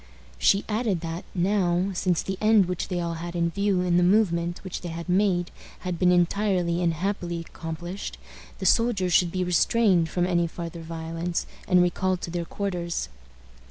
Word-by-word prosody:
She 200 - +3
added 215 -5 0
that, 165 +1 -5
now, 185 0 +1
since 180 -2 0
the 190 -1 -4
end 215 -2 +5
which 180 0 -3
they 180 -2 -2
all 170 -1 -2
had 175 0 -6
in 170 -1 +1
view 200 0 +1
in 175 -1 +2
the - - +4
movement 175 -3 +2
which 185 -2 -5
they 175 - -5
had 165 +1 -6
made 180 -1 +2 0.3
had 180 -2 -3
been 180 -1 +4
entirely 180 -1 +1
and 170 -1 +2
happily 175 -1 -2
accomplished, 170 +3 -6 0.4
the - - -5
soldiers 205 -7 +2
should 175 0 +4
be 185 0 -1
restrained 180 -1 +3
from 175 +1 0
any 175 -2 +1
farther 170 0 -7
violence, 165 +1 -3 0.2
and 180 -1 +5
recalled 185 +1 0
to 170 - -5
their 170 -1 -2
quarters. 175 - -3
180 Hz, 175 wpm, -26 LUFS, 170-190 Hz, 0.4 s, end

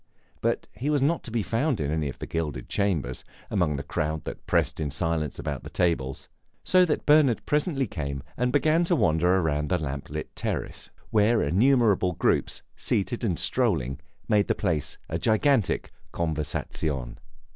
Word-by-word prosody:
But - - 0
he 130 +8 -3
was 145 -3 +2
not 165 +3 +2
to - - -3
be 115 -2 0
found 115 - 0
in 75 -1 -1
any 80 -2 -1
of - - -8
the - - -6
gilded 75 -6 -3
chambers, 80 -12 -1 0.3
among 85 -8 +1
the 70 - -4
crowd 75 +2 -2
that - - -8
pressed - - +1
in 75 -2 -1
silence 80 0 -1
about - - -4
the - - -9
tables; 75 -7 -1 0.4
so 185 -1 +5
that 155 - -1
Bernard 145 -5 +4
presently 150 -2 +1
came 70 - -4
and 125 0 0
began 155 +4 +3
to 175 - +2
wander 90 - +3
about 75 -4 0
the 90 - +2
lamp 70 -4 -5
lit - - -6
terrace, - - -4 0.2
where 110 +2 +3
innumerable 105 -4 +3
groups, - - 0
seated 115 +5 -1
and 95 -7 0
strolling, 65 +2 0 0.3
made 105 -1 +3
the - - +1
place 75 -4 -1
a 80 - -3
gigantic 110 - +2 0.2
conversazione. 75 -4 -2
90 Hz, 170 wpm, -26 LUFS, 75-125 Hz, 0.4 s, so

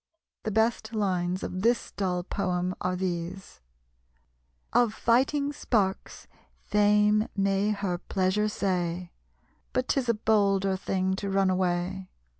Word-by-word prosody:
The - - -3
best 220 +1 0
lines 185 -3 0
of 185 - -4
this 235 +3 +1
dull 180 -3 -1
poem 180 -1 -1
are 180 0 0
these: 180 - -4 1.1
"Of 230 -3 +3
fighting 280 +5 +2
sparks 200 -9 -1 0.4
Fame 210 +1 +3
may 195 +1 +1
her 200 -4 -1
pleasure 190 +3 0
say, 180 -3 -2 0.6
But 255 0 0
'tis 260 -3 +1
a 235 - +3
bolder 200 -3 +2
thing 190 0 -1
to 200 -1 -3
run 195 -1 +2
away. 185 +1 -1
195 Hz, 120 wpm, -27 LUFS, 185-215 Hz, 1.1 s, Of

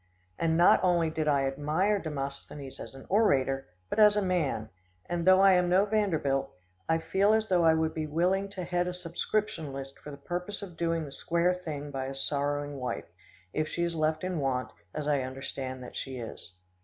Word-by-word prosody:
And 160 -1 +2
not 175 +2 +6
only 170 -3 +3
did 155 -1 -2
I 140 -2 +3
admire 155 +10 +1
Demosthenes 140 -3 -6
as - - -8
an 135 - -11
orator, 135 -10 +2 0.2
but 215 - -2
as 210 -1 +7
a 210 - +2
man; 155 - -1 0.4
and, 175 0 -2
though 185 0 +7
I 195 0 +7
am 180 -1 +3
no 190 +3 +4
Vanderbilt, 170 -11 +1 0.4
I 160 - +4
feel 195 +5 +2
as 220 0 +1
though 180 -2 +3
I 160 -1 +6
would 160 0 0
be 155 -1 -3
willing 185 +6 +1
to 190 -2 -5
head 175 0 0
a 180 - -3
subscription 175 -2 -2
list 135 0 -6
for - - -10
the 140 - -8
purpose 180 +7 -5
of 180 -4 -9
doing 165 -1 0
the 140 - -9
square 170 +5 +1
thing 150 -5 -6
by 135 -1 -3
his 135 0 -2
sorrowing 145 0 -1
wife, 125 -9 -3 0.5
if 155 0 0
she 170 - -2
is 170 0 0
left 155 0 0
in 180 -3 -1
want, 130 -2 -1 0.2
as 150 -1 -4
I 145 -2 +2
understand 130 0 -5
that 125 - -10
she 135 -1 -5
is. 115 -5 -8
160 Hz, 205 wpm, -29 LUFS, 140-180 Hz, 0.5 s, as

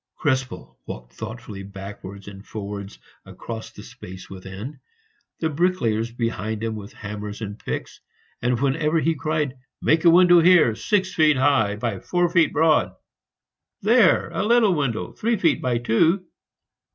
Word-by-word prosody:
Krespel 130 -5 -2
walked - - -8
thoughtfully 110 - -8
backwards 100 0 -9
and 100 -1 -10
forwards 100 -2 -7 0.3
across 115 -1 -8
the - - -12
space 95 +1 -11
within, 95 +8 -8 0.6
the 160 - 0
bricklayers 140 -9 0
behind 110 -2 -3
him 115 -1 -1
with 105 +1 -8
hammers 105 0 -7
and 105 -1 -6
picks, - - -5 0.4
and 120 0 +1
wherever 150 +4 +1
he 165 +1 +1
cried, 150 -3 -2 0.2
"Make 160 +1 +2
a 170 - +7
window 175 0 +7
here, 170 -9 +6
six 190 - 0
feet 155 -3 +4
high 130 -7 +2
by 105 -2 -3
four 175 - 0
feet 170 -2 +4
broad!" 150 - +2 0.9
"There 225 -2 +4
a - - -2
little 225 -2 +4
window, 135 -8 -2
three 230 +1 -1
feet 165 -4 +2
by 125 -2 0
two!" 160 - +2
125 Hz, 145 wpm, -23 LUFS, 105-165 Hz, 0.9 s, a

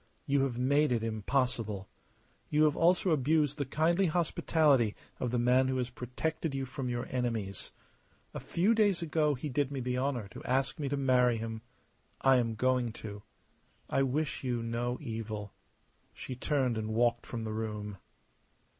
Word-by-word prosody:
You 140 0 +2
have 125 -3 -3
made 140 +3 +3
it 115 -2 +1
impossible. 110 -2 -1 0.6
You 150 0 +3
have 150 -1 +4
also 175 +2 +3
abused 150 0 +2
the 145 - 0
kindly 170 +7 +2
hospitality 155 -7 +2 0.2
of 125 - -1
the 120 - 0
man 125 +2 +4
who 130 0 0
has 125 -1 -2
protected 135 +5 -3
you 135 -1 -2
from 130 0 -4
your 120 0 -2
enemies. 115 -7 -2 0.6
A - - -4
few 190 +7 +2
days 205 -6 +2
ago 155 -2 +1
he 130 +4 -5
did 145 0 0
me 140 - -3
the 125 0 -1
honour 130 -6 -1
to - - -10
ask 135 +3 0
me 140 -2 -2
to 140 - -1
marry 125 -3 +3
him. 110 0 -5 0.6
I 135 -1 +5
am 115 -2 0
going 125 0 +1
to. 105 -2 -8 0.7
I - - +3
wish 140 +3 -1
you 120 -3 -1
no 120 +2 -2
evil." 110 -2 -5 0.6
She 130 - -6
turned 130 -3 0
and 110 0 -3
walked 120 0 +2
from 115 -2 -4
the 110 -1 -3
room. 105 -2 -4
125 Hz, 170 wpm, -31 LUFS, 115-145 Hz, 0.7 s, I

